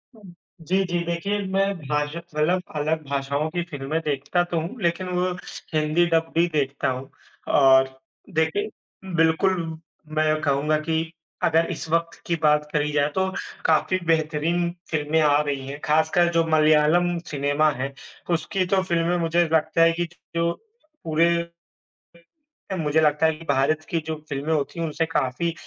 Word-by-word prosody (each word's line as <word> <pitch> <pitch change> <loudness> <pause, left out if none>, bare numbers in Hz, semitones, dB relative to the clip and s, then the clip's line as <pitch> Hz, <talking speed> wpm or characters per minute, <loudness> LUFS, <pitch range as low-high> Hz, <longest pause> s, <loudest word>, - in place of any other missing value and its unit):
हुँ, 200 -5 -14 0.3
जी, 190 +4 +1
जी, 175 -1 -1
देखिए 170 +5 -1
मैं 195 0 +3 0.2
भाषा 150 +2 -1
मतलब 170 +2 0
अलग 155 +1 -1
भाषाओं 140 +2 -1
की 175 +1 -2
फ़िल्में 145 +2 -2
देखता 150 +5 0
तो 175 -2 -2
हूँ, 205 +8 -7
लेकिन 175 +2 0
वो 180 0 0 0.4
हिंदी 155 +3 +2
डब 165 0 +1
भी 170 +1 +4
देखता 140 -2 0
हूँ। 130 +1 -4 0.4
और, 130 -1 +4 0.3
देखिए, 160 +7 0 0.5
बिल्कुल 165 +4 +3 0.6
मैं 155 0 +2
कहूँगा 150 +1 +1
कि 160 +1 0 0.4
अगर 165 +1 +3
इस 160 - -5
वक़्त 165 0 0
की 170 - 0
बात 150 0 +3
करी 150 0 +1
जाए 145 0 +2
तो 190 0 +1 0.4
काफ़ी 175 +4 +2
बेहतरीन 165 +2 +1 0.2
फ़िल्में 155 0 +1
आ 145 -1 +4
रही 140 -2 -3
हैं। 140 +2 -6
ख़ासकर 160 +3 +3
जो 165 0 +4
मलयालम 155 +3 +4
सिनेमा 145 +2 +2
है 135 +1 -3 0.4
उसकी 185 +4 0
तो 190 - +3
फ़िल्में 170 0 +1
मुझे 170 +1 +2
लगता 160 +1 +2
है 165 - +6
कि, 175 +1 -1 0.3
जो 170 0 +2 0.5
पूरे 165 +1 +3 1.5
मुझे 155 0 +2
लगता 150 0 +3
है 160 - +3
कि 165 +1 -12
भारत 140 +3 +2
की 165 - 0
जो 160 - -2
फ़िल्में 145 +3 -2
होती 155 +2 -2
हैं 165 - 0
उनसे 160 +1 -1
काफ़ी 165 +2 -1
160 Hz, 155 wpm, -24 LUFS, 150-170 Hz, 1.5 s, है